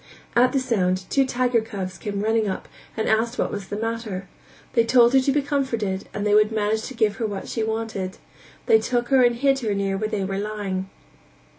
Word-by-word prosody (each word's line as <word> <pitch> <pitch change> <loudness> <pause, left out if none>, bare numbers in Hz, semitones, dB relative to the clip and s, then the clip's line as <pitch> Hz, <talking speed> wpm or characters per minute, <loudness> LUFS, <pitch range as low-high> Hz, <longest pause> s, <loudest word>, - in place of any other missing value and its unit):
At 250 +2 +5
the 270 - +1
sound 190 -7 0
two 270 -1 +3
tiger 245 -2 +1
cubs 195 -4 -6
came 200 -2 -3
running 220 0 +2
up 190 - -5 0.3
and 220 - -1
asked 230 +2 +1
what - - 0
was 200 -2 -5
the 205 - -4
matter; 225 -4 -4 0.5
they 230 - +4
told 240 +1 +5
her 270 - +7
to 265 +1 +1
be 290 +1 +1
comforted 230 -9 -2
and 205 - -3
they 205 - +2
would 215 +1 +5
manage 220 0 0
to 265 - -8
give 210 -3 +1
her 225 - -1
what 200 -2 -5
she 225 - -3
wanted; 220 -2 -2
and - - -18 0.5
they 445 -1 +5
took 245 - -1
her 265 -2 +5
and 240 -1 +4
hid 270 +2 +2
her 215 -5 -1
near 195 -1 -1
where 215 0 -1
they 200 -2 -1
were 195 +1 -2
lying. 200 -3 -3
220 Hz, 225 wpm, -23 LUFS, 200-245 Hz, 0.5 s, her